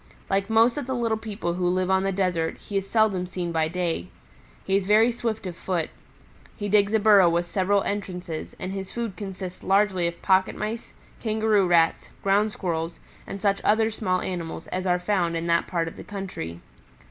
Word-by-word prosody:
Like 195 +1 +1
most 225 +3 +4
of 285 -4 -3
the 260 - -1
little 230 -2 +1
people 210 -5 -3
who 180 0 0
live 185 +1 +1
on 190 0 +4
the 195 0 0
desert, 180 -4 0
he 205 - -9
is 195 0 -3
seldom 210 -5 +2
seen 175 -1 -3
by 160 -1 +1
day. 170 - -2 0.6
He 195 - +1
is 195 -1 +1
very 220 +3 +5
swift 230 -3 -3
of 180 -2 -5
foot. 170 -2 -2 0.7
He 205 - -3
digs 205 0 +4
a - - +4
burrow 205 -4 +6
with 170 +1 +1
several 195 +3 +1
entrances 180 -5 -4
and 185 - -4
his 195 -1 -5
food 230 -5 -4
consists 185 -3 -7
largely 190 -2 +2
of 170 0 -5
Pocket 190 -1 +3
Mice, 220 +2 -5 0.3
Kangaroo 215 -3 +2
Rats, 165 -2 +3
Ground 205 +2 +3
squirrels 165 -4 -3 0.3
and 195 - -5
such 200 0 +1
other 220 +1 +3
small 185 -4 -1
animals 170 -3 -4
as 185 +1 -2
are 180 0 +3
found 180 -3 0
in 165 - -3
that 170 0 +2
part 170 -2 -1
of 165 - -8
the - - -8
country. 180 - -6
190 Hz, 195 wpm, -25 LUFS, 175-210 Hz, 0.7 s, burrow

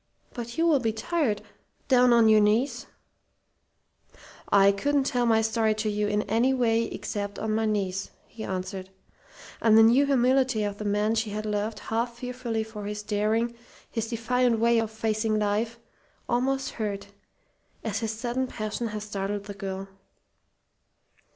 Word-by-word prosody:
"But 235 -1 -6
you 330 - +3
will 315 -5 +4
be 225 -3 0
tired 225 -2 -1 0.4
down 250 -2 +5
on 235 -1 +6
your 215 0 +6
knees 235 +4 +1 0.8
" - - -23 0.2
"I - - +7
couldn't 280 +8 +1
tell 245 -3 0
my 225 -1 +4
story 220 -1 +1
to 215 0 -1
you 210 0 0
in 210 0 0
any 235 +6 +2
way 230 -2 +2
except 205 -2 -5
on 220 0 -2
my 220 0 +1
knees," 195 -2 -1 0.2
he 220 - -9
answered. 185 0 -4 0.7
And 220 -1 +5
the 225 - +8
new 250 +5 +5
humility 260 -3 +2
of 205 -1 -3
the 210 - -5
man 210 +2 +1
she 225 -1 0
had 215 +1 -4
loved 210 +1 -2
half 235 +3 -2
fearfully 245 -2 -3
for 215 -2 -8
his 210 0 -5
daring, 215 +3 0 0.4
his 225 -2 -2
defiant 240 +1 +1
way 235 +1 +3
of 225 -1 -1
facing 220 0 -1
life, 215 +3 0 0.5
almost 270 +3 0
hurt, 200 -2 -4 0.7
as 215 -2 -2
his 225 - -2
sudden 240 +3 -2
passion 215 0 -4
had 210 -1 -5
startled 200 -1 -3
the 205 0 -7
girl. 195 -1 -5
220 Hz, 160 wpm, -27 LUFS, 210-240 Hz, 0.8 s, the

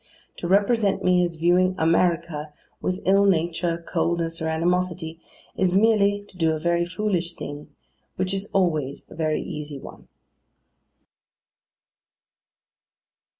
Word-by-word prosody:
To 175 - -4
represent 200 0 +2
me 180 -1 +4
as 170 -1 -2
viewing 180 +3 +3
AMERICA 165 -2 +1 0.3
with 185 +1 -2
ill 195 +1 +5
nature, 170 -2 0
coldness, 165 -1 -1
or 160 - -1
animosity, 165 0 -1 0.4
is 185 -1 +1
merely 205 -1 +3
to 185 - -13
do 160 -2 +2
a 155 - -3
very 170 +1 +1
foolish 175 -2 -2
thing: 145 +1 -7 0.5
which 185 +1 -1
is 195 +1 -3
always 155 -8 0
a - - -10
very 155 -1 -1
easy 150 -1 -6
one. - - -12
175 Hz, 120 wpm, -24 LUFS, 160-190 Hz, 0.5 s, ill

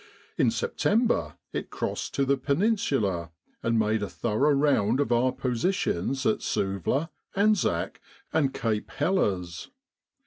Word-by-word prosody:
In - - +3
September 215 - +1 0.2
it - - -3
crossed - - -3
to 140 - +2
the 140 +1 +3
Peninsula 135 - 0 0.3
and 115 0 +1
made 110 0 +2
a 105 - -2
thorough 120 +6 +1
round 135 -5 +2
of 145 - 0
our 120 +2 +3
positions 130 - -1
at 110 - +2
Suvla, 100 - -1 0.2
Anzac, 200 - +1 0.3
and 150 -4 +2
Cape 110 -4 -2
Helles. 95 - -1
130 Hz, 125 wpm, -27 LUFS, 105-150 Hz, 0.3 s, In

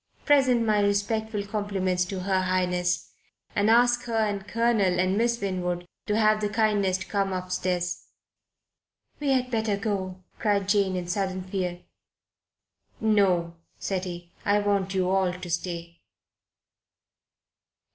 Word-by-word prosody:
Present 260 -5 +4
my 215 -1 +3
respectful 205 +1 0
compliments 195 -3 -1
to 185 0 -5
Her 190 0 +1
Highness, 180 -1 0 0.4
and 205 +1 +3
ask 240 +1 +4
her 230 -2 -3
and 205 -2 0
Colonel 215 -4 +2
and 185 +1 +2
Miss 235 +2 +1
Winwood 180 -3 -2 0.2
to 210 - +1
have 215 -1 +3
the 210 - 0
kindness 205 -3 +2
to 190 - -7
come 195 -1 -1
upstairs." 180 -1 -2 1.1
"We 290 -1 -1
had 255 -2 +1
better 220 -3 0
go," 190 -3 -3 0.2
cried 200 -3 +1
Jane 200 -2 +2
in 180 -1 -3
sudden 185 0 -2
fear. 180 -2 -3 1.2
"No," 190 -6 +2 0.2
said 190 -1 -2
he. 175 -1 -7
"I 205 0 +3
want 200 -2 0
you 185 -1 +1
all 190 -1 +2
to 180 0 -8
stay." 170 0 -4
195 Hz, 135 wpm, -26 LUFS, 185-215 Hz, 1.2 s, Present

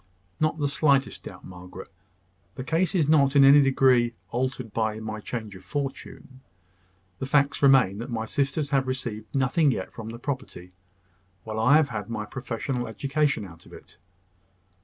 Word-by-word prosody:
"Not 155 0 +1
the 145 -2 0
slightest 140 -1 +1
doubt, - - -10
Margaret. 90 +1 -11 0.6
The 130 - -5
case 170 +7 0
is 160 -6 +2
not 145 -3 +4
in 140 - +7
any 140 +2 +8
degree 130 -3 +3 0.2
altered 125 -2 -3
by 110 -1 -1
my 110 -1 -5
change 110 -2 -6
of 95 - -13
fortune. 135 0 -6 0.8
The 130 - -4
facts 140 0 +2
remain, 130 -8 +4
that 120 +3 -6
my 110 -2 -3
sisters 140 +3 -1
have 135 -2 +1
received 120 -4 -4
nothing 135 +4 +2
yet 95 -8 -3
from 110 -1 -8
the 115 - -7
property, 130 -9 -6 0.7
while 110 0 -5
I 125 +6 +5
have 155 -3 +2
had 105 -3 -5
my 110 -2 -4
professional 125 +1 -4
education 140 +2 -1
out 85 -3 -14
of - - -16
it. - - -14
130 Hz, 165 wpm, -26 LUFS, 110-140 Hz, 0.8 s, any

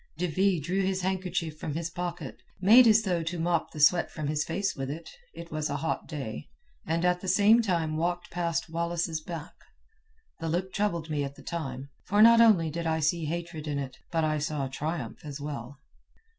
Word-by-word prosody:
De 180 - 0
Ville 185 +2 +2
drew 180 +7 -1
his 190 0 0
handkerchief 180 -4 -2
from 150 - -4
his 165 +1 -3
pocket, 175 -1 -5 0.2
made 225 +6 +8
as 220 0 +5
though 180 -4 0
to 170 +2 -3
mop 170 0 0
the 155 - -9
sweat 170 +4 +5
from 155 - -5
his 150 0 0
face 190 +2 -2
with 135 0 -4
it 160 +4 -7 0.2
(it 170 0 -9
was 155 -1 -2
a 145 - -2
hot 160 - -2
day), 130 - -6 0.4
and 165 +2 0
at 180 0 +2
the 190 - -6
same 205 +5 +5
time 170 -7 0
walked 175 +2 -2
past 170 -1 -1
Wallace's 170 0 -2
back. 165 0 -7 0.9
The 165 - -3
look 185 +3 -2
troubled 170 -6 -1
me 145 -2 0
at 140 0 -5
the - - -14
time, 140 -5 -5
for 205 - 0
not 230 0 +8
only 185 -9 +5
did 170 +1 -3
I 160 0 +1
see 160 +1 +1
hatred 165 -1 -4
in 145 -1 -1
it, 130 -2 -5
but 165 -1 +1
I 155 -1 +1
saw 150 -2 -2
triumph 140 -2 -4
as 145 -1 -7
well. 145 -2 -6
165 Hz, 205 wpm, -28 LUFS, 150-180 Hz, 0.9 s, made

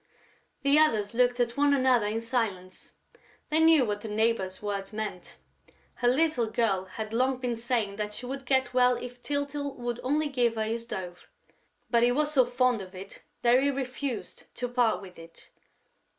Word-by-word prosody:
The 280 +2 +5
others 220 -10 +2
looked 245 +1 +2
at 240 -1 0
one 285 0 +3
another 255 -5 +3
in 220 +2 -2
silence: 220 -7 -3 0.5
they 310 +1 +2
knew 320 -4 +6
what 205 -1 -3
the 220 - -6
neighbor's 210 -3 0
words 200 -2 -4
meant. 210 -4 -6 0.6
Her 245 - -1
little 255 -3 +2
girl 215 -5 0
had 215 +3 -7
long 255 +2 +1
been 250 -2 -2
saying 230 -4 -1
that 210 0 -3
she 250 - -6
would 270 0 -6
get 260 -1 +1
well 250 0 +4
if 245 0 -9
Tyltyl 285 0 -3
would 240 -1 -4
only 295 +4 0
give 245 -4 +1
her 220 - -1
his 230 +1 -3
dove; 180 -4 -7 0.6
but 235 -1 +4
he 240 +1 +4
was 300 +4 +1
so 260 -4 +4
fond 245 -2 +1
of 185 0 -11
it 190 +1 -10 0.2
that 240 +1 +5
he 280 - +2
refused 265 -1 -4
to 245 - -3
part 240 -4 +1
with 185 -3 -12
it.... 165 0 -15
240 Hz, 180 wpm, -28 LUFS, 215-260 Hz, 0.6 s, knew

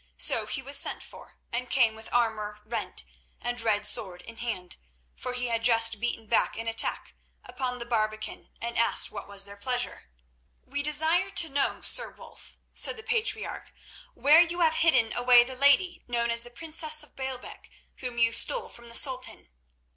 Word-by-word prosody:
So - - +2
he 270 - +1
was 275 +2 +1
sent - - -1
for, - - -15 0.2
and 245 +1 -3
came 230 -4 +3
with 220 0 -11
armour 215 -3 -1
rent 230 +2 -2 0.4
and 245 0 -4
red 215 -2 0
sword 185 -4 -1
in 230 0 -12
hand, 220 -7 -4 0.4
for 250 - -5
he 250 0 -1
had 230 -1 -2
just 225 -2 +5
beaten 235 -1 -3
back - - +1
an 225 0 -5
attack 225 0 -1 0.3
upon 250 -1 -4
the 235 - -7
barbican, 215 -2 -2
and 235 0 -3
asked 230 - +3
what - - -8
was 200 -1 -3
their 200 0 -12
pleasure. 245 - -3 0.6
"We 285 +2 -4
desire 315 +6 +1
to 355 -4 +2
know, 280 0 -1
Sir - - -1
Wulf," - - -13 0.2
said 470 - +2
the 445 - -10
patriarch, 455 0 -2 0.4
"where 300 +4 +6
you 345 0 +2
have 320 -1 +3
hidden 260 -9 +3
away 245 0 +6
the 260 +1 -7
lady 285 +7 +3
known 235 -1 0
as 235 0 +3
the 240 - -11
princess 310 +3 0
of 300 - -19
Baalbec, 265 -1 -7 0.3
whom 250 -2 -5
you 230 -1 +3
stole 475 - +2
from 235 0 -12
the 235 - -6
Sultan?" 255 - +2
245 Hz, 180 wpm, -27 LUFS, 225-285 Hz, 0.6 s, where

